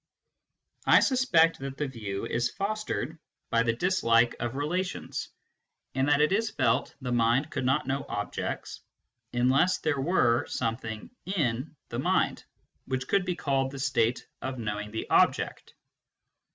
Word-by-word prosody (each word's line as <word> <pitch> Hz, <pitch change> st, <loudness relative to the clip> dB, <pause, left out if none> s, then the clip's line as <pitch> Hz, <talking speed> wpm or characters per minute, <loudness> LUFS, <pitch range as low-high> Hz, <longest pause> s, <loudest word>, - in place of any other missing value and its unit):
I -, -, +8 dB
suspect 215 Hz, -, +3 dB
that 135 Hz, 0 st, -6 dB
the 150 Hz, -, -1 dB
view 105 Hz, -6 st, -5 dB
is 120 Hz, +1 st, 0 dB
fostered 200 Hz, -, -3 dB, 0.3 s
by 115 Hz, -, +4 dB
the 115 Hz, -1 st, +2 dB
dislike 120 Hz, -8 st, +3 dB
of 120 Hz, 0 st, -2 dB
relations7)and 175 Hz, +7 st, -2 dB, 0.8 s
that 145 Hz, 0 st, +4 dB
it 150 Hz, -, +3 dB
is 220 Hz, +3 st, +2 dB
felt 130 Hz, -1 st, +1 dB
the 125 Hz, -1 st, -3 dB
mind 120 Hz, +5 st, +2 dB
could 130 Hz, -, -2 dB
not 135 Hz, +3 st, +2 dB
know 135 Hz, +1 st, -1 dB
objects -, -, -4 dB, 0.5 s
unless 135 Hz, +9 st, +3 dB
there 145 Hz, -3 st, -1 dB
were 125 Hz, -7 st, +2 dB
something 115 Hz, -2 st, -3 dB, 0.2 s
"in 150 Hz, -, -1 dB
" -, -, -51 dB
the -, -, -3 dB
mind -, -, +1 dB, 0.4 s
which 130 Hz, -1 st, -3 dB
could 195 Hz, -2 st, +2 dB
be 180 Hz, -1 st, -1 dB
called 135 Hz, -4 st, 0 dB
the 140 Hz, -, -8 dB
state 130 Hz, -3 st, +1 dB, 0.2 s
of 130 Hz, 0 st, -4 dB
knowing 105 Hz, -2 st, -3 dB
the 110 Hz, +1 st, -4 dB
object. -, -, +2 dB
135 Hz, 145 wpm, -28 LUFS, 120-160 Hz, 0.8 s, I